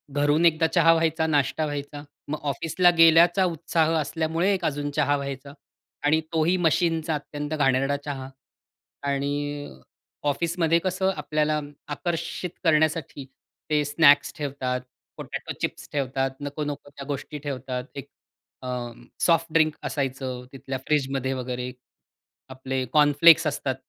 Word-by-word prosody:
घरून 145 +3 +3
एकदा 160 0 +4
चहा 165 -1 +5
व्हायचा, 160 -1 +1
नाष्टा 150 +1 +1
व्हायचा. 145 0 -5 0.3
मग 150 +1 -3
ऑफिसला 170 +5 +2
गेल्याचा 165 +3 +6
उत्साह 165 -1 0
असल्यामुळे 165 +5 0
एक 180 -3 -2
अजून 145 0 -1
चहा 145 0 +2
व्हायचा 140 0 -6 0.5
आणि 160 +2 +3
तोही 165 +3 +2
मशीनचा 165 -1 +1
अत्यंत 145 +1 -5
घाणेरडा 135 0 +2
चहा 135 -2 -5 0.8
आणि 140 +1 -1 1.0
ऑफिसमध्ये 170 +2 +1
कसं 190 +1 0
आपल्याला 155 0 0 0.3
आकर्षित 170 +3 -3
करण्यासाठी 155 -3 +1 0.4
ते 150 -1 +2
स्नॅक्स 145 -1 +5
ठेवतात, 130 -3 -3 0.4
पोटाटो - - -6
चिप्स - - -4
ठेवतात. 135 -1 -1
नको 145 +1 -4
नको 145 -1 -6
त्या 140 -1 -10
गोष्टी 145 +1 -5
ठेवतात. 130 -3 -4
एक 140 - -8 0.5
अ, 130 - -7 0.5
सॉफ्ट 165 -1 +3
ड्रिंक 155 -1 +4
असायचं 130 -3 -3
तिथल्या 135 0 -5
फ्रिजमध्ये 135 -3 0
वगैरे 125 0 -4 0.8
आपले 130 0 -3
कॉर्नफ्लेक्स 150 +2 +6
असतात. 140 -3 -1
145 Hz, 125 wpm, -25 LUFS, 140-165 Hz, 1.0 s, गेल्याचा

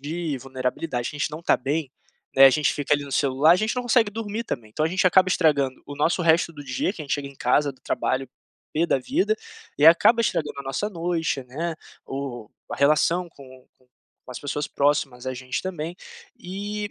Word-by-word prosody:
de 155 0 -3
vulnerabilidade, 130 0 -3
que - - -9
a - - -9
gente 150 - -1
não 155 +3 -7
tá - - +3
bem, 140 +1 -2 0.4
né, 135 - +8
a 135 - +10
gente 150 +2 +2
fica 145 0 -2
ali 145 0 -2
no 140 - -10
celular, 140 +2 +3
a - - +5
gente 215 +4 -1
não 250 - -1
consegue 235 -3 +3
dormir 220 +1 -4
também, 110 - -5
então 155 +8 -1
a - - +2
gente 185 +2 +1
acaba 185 +1 +5
estragando 140 -7 +2
o 145 0 -8
nosso 165 +4 +1
resto 165 0 +3
do 145 -1 -10
dia, 135 +7 -2
que 160 - -8
a - - -8
gente 140 - 0
chega 145 -1 -4
em 140 - -14
casa 140 +3 +2
do 130 - -26
trabalho 130 0 -1 0.4
pê 165 +3 +1
da 135 - +2
vida, 360 - +1 0.4
e 145 - +2
aí - - +11
acaba 230 +7 +4
estragando 165 -10 -1
a - - -7
nossa 135 +10 -2
noite, 165 -5 -2
né. 160 +7 -4 0.3
O 130 -5 -6 0.2
o - - -4
a - - -10
relação 155 +5 +2
com 130 -3 -15
com 130 - -30 0.4
com - - -10
as 125 - -6
pessoas 145 +1 -3
próximas 140 -3 0
da 130 - -2
gente 130 0 -4
também. 175 -2 -5 0.4
E 205 +3 -5
150 Hz, 225 wpm, -24 LUFS, 135-175 Hz, 0.4 s, aí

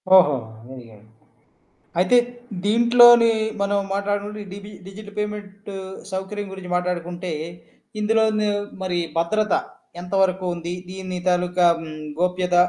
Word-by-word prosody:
ఓహొ! 160 -7 +7 0.4
అయ్యాయో! 115 -5 -13 1.0
అయితే 185 +7 +4 0.5
దీంట్లోని 235 +2 +7 0.3
మనం 200 0 +1
మాట్లాడకుంటే, 205 +1 -2
డిబి 200 +2 -9
డిజిట్ 205 +2 -10
పేమెంటు 205 -1 -5 0.4
సౌకర్యం 195 +2 -4
గురించి 190 -2 -8
మాట్లాడుకుంటే, 180 0 -3 0.7
ఇందులోను 215 0 +2 0.3
మరి 180 -2 -1 0.2
భద్రత, 210 +5 +1 0.5
ఎంత 180 +2 -10
వరకు 185 0 +1
ఉంది? 170 +1 -5 0.2
దీన్ని 185 -1 -5
తాలూకా 180 0 +2
హ్మ్, 155 -1 -8 0.2
గోప్యత 180 0 +1
190 Hz, 105 wpm, -22 LUFS, 180-210 Hz, 1.0 s, ఓహొ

